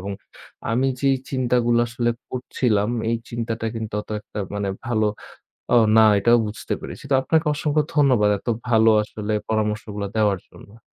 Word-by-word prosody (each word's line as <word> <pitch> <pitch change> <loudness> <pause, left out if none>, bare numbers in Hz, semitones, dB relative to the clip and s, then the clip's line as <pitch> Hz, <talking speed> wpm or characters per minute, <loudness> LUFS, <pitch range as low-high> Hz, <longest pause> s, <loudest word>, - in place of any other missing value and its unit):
এবং 100 +2 -5 0.6
আমি 125 +4 +1
যেই 135 -1 +3
চিন্তাগুলো 120 -2 +2
আসলে 120 0 0 0.2
করছিলাম 120 -4 0 0.2
এই 115 - +1
চিন্তাটা 115 -1 -3
কিন্তু 110 -2 -5
অত - - -14
একটা 105 - -10 0.2
মানে 100 -1 -2 0.2
ভালো 110 -3 +1 0.7
ও - - +7 0.2
না 110 - +8
এটাও 120 +3 +5
বুঝতে 105 - -5
পেরেছি। - - -8
তো - - +5
আপনাকে 160 +4 +1
অসংখ্য 150 0 +1
ধন্যবাদ। 125 -8 +4
এত - - -28 0.2
ভালো 110 -1 +5
আসলে 105 0 -5 0.2
পরামর্শগুলো 105 -1 -2
দেওয়ার 105 -3 +2
জন্য। 110 +3 -16
115 Hz, 155 wpm, -22 LUFS, 105-125 Hz, 0.7 s, না